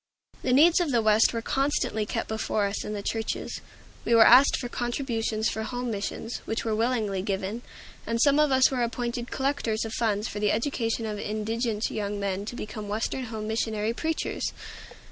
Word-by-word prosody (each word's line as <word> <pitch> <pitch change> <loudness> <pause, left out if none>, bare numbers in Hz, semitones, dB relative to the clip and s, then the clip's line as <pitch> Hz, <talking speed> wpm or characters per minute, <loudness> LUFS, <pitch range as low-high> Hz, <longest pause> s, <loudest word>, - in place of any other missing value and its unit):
The 255 - 0
needs 320 +7 +6
of 345 -4 0
the 245 -4 +3
West 215 0 +5
were 230 -1 -3
constantly 270 -6 0
kept - - -2
before 220 -1 -1
us 200 +1 -2
in 210 - -4
the 205 -1 -4
churches. 225 +1 -3 0.4
We 235 - +3
were 225 -1 +8
asked 260 +4 +7
for 245 - -4
contributions 235 -3 -1
for 220 - -2
Home 245 +2 -3
Missions, 215 +3 -4
which 225 - -3
were 220 - 0
willingly 215 -4 0
given; 195 +3 -3 0.5
and 230 0 0
some 285 +3 +4
of 300 -2 +4
us 260 0 +5
were 255 -2 -1
appointed 240 0 -2
collectors 265 -5 -1
of 225 - -5
funds 215 -2 0
for 205 - -5
the 210 -1 +2
education 230 -1 -1
of 210 -1 -4
indigent 215 +1 -2
young 205 -1 -3
men 200 0 -2
to 240 - -6
become 215 -2 -6
Western 225 +5 -2
Home 220 -2 -5
Missionary 220 0 -1
preachers. 320 +5 -2
225 Hz, 185 wpm, -27 LUFS, 215-245 Hz, 0.5 s, were